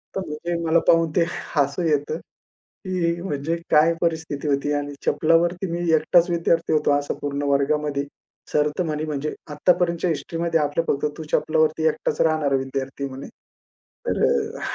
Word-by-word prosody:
तर 195 Hz, -, -1 dB
म्हणजे 160 Hz, +3 st, -3 dB
मला 165 Hz, +1 st, +4 dB
पाहून 165 Hz, -1 st, +4 dB
ते 170 Hz, -, +4 dB, 0.3 s
हसू 145 Hz, +3 st, +1 dB
येतं 150 Hz, +1 st, 0 dB, 0.7 s
की 170 Hz, -2 st, -1 dB
म्हणजे 160 Hz, -2 st, -2 dB
काय 160 Hz, +2 st, +5 dB
परिस्थिती 160 Hz, -3 st, -2 dB
होती 140 Hz, 0 st, 0 dB
आणि 145 Hz, 0 st, -2 dB
चपलावरती 170 Hz, +3 st, +2 dB
मी 170 Hz, -, -2 dB, 0.2 s
एकटाच 170 Hz, +3 st, +3 dB
विद्यार्थी 165 Hz, -1 st, +1 dB
होतो 155 Hz, -1 st, +2 dB
असं 145 Hz, 0 st, 0 dB
पूर्ण 145 Hz, 0 st, -2 dB
वर्गामध्ये. 140 Hz, 0 st, +1 dB, 0.5 s
सर 150 Hz, 0 st, +2 dB
तर 180 Hz, -, +1 dB
म्हणे 155 Hz, -2 st, -2 dB
म्हणजे 150 Hz, 0 st, -3 dB, 0.2 s
"आत्तापर्यंतच्या 170 Hz, +3 st, +1 dB
हिस्ट्रीमध्ये 165 Hz, +1 st, -1 dB
आपलं 150 Hz, +2 st, 0 dB
फक्त 140 Hz, -, 0 dB
तू 160 Hz, -, -6 dB
चपलावरती 155 Hz, 0 st, +2 dB
एकटाच 155 Hz, -, -1 dB
राहणारा 155 Hz, -4 st, +2 dB
विद्यार्थी," 135 Hz, +1 st, -3 dB
आहे 140 Hz, -, -2 dB
म्हणे. 135 Hz, +1 st, -8 dB, 0.8 s
तर -, -, 0 dB
अ, -, -, 0 dB
155 Hz, 155 wpm, -23 LUFS, 145-170 Hz, 0.8 s, काय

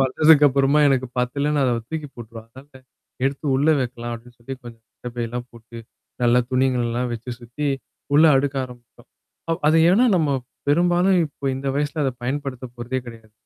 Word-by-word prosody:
வளந்ததுக்கப்புறமா 140 Hz, 0 st, +4 dB
எனக்கு 130 Hz, -1 st, +1 dB
பத்துல 140 Hz, +4 st, 0 dB
நான் 140 Hz, -, +2 dB
அத 125 Hz, -2 st, +2 dB, 0.2 s
தூக்கி 155 Hz, -2 st, -4 dB
போட்டுருவா. 115 Hz, -1 st, -10 dB
அதனால 130 Hz, +2 st, -15 dB, 0.4 s
எடுத்து 140 Hz, +3 st, -2 dB
உள்ள 145 Hz, +3 st, +2 dB
வைக்கலாம் 120 Hz, -1 st, -4 dB
அப்டின்னு 120 Hz, +1 st, -13 dB
சொல்லி 125 Hz, +3 st, -7 dB
கொஞ்சம் 115 Hz, -1 st, -11 dB, 0.2 s
கட்ட 125 Hz, -, -4 dB
பையெல்லாம் 120 Hz, +1 st, -4 dB
போட்டு, 115 Hz, 0 st, -12 dB, 0.4 s
நல்லா 120 Hz, +1 st, +4 dB
துணிங்கள்ல்லாம் 125 Hz, -2 st, 0 dB
வச்சு 120 Hz, +2 st, -6 dB
சுத்தி, 125 Hz, +5 st, -4 dB, 0.5 s
உள்ள 155 Hz, +3 st, +7 dB
அடுக்க 140 Hz, +1 st, 0 dB
ஆரம்பிச்சோம். 120 Hz, -2 st, -15 dB, 0.4 s
அ -, -, +3 dB, 0.2 s
அது 155 Hz, -, +4 dB
ஏன்னா 235 Hz, +7 st, +4 dB
நம்ம 155 Hz, -4 st, +1 dB, 0.4 s
பெரும்பாலும் 175 Hz, +4 st, +3 dB
இப்ப 140 Hz, -1 st, -4 dB
இந்த 135 Hz, +1 st, -3 dB
வயசுல 150 Hz, +1 st, -1 dB
அத 135 Hz, -, +1 dB
பயன்படுத்த 135 Hz, -1 st, -4 dB
போறதே 120 Hz, +2 st, -3 dB
கிடையாது. 115 Hz, -2 st, -12 dB
130 Hz, 160 wpm, -22 LUFS, 120-145 Hz, 0.5 s, உள்ள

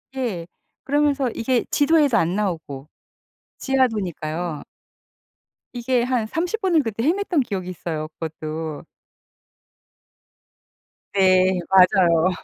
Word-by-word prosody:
예. 215 Hz, -11 st, -3 dB, 0.4 s
그러면서 285 Hz, -2 st, +1 dB
이게 245 Hz, +1 st, 0 dB
지도에도 290 Hz, -5 st, +3 dB
안 175 Hz, 0 st, +1 dB
나오고. 160 Hz, -9 st, -3 dB, 0.7 s
지하도니까요. 180 Hz, -, -1 dB, 1.1 s
이게 245 Hz, 0 st, 0 dB
한 245 Hz, -3 st, -1 dB
30 355 Hz, -, -2 dB
분을 345 Hz, -6 st, +2 dB
그때 225 Hz, 0 st, -3 dB
헤맸던 350 Hz, 0 st, +1 dB
기억이 185 Hz, -3 st, -4 dB
있어요. 160 Hz, -3 st, -5 dB
그것도. 155 Hz, -1 st, -5 dB, 2.3 s
네. 185 Hz, -1 st, +3 dB
맞아요. 185 Hz, -3 st, +5 dB
205 Hz, 210 characters per minute, -22 LUFS, 170-265 Hz, 2.3 s, 맞아요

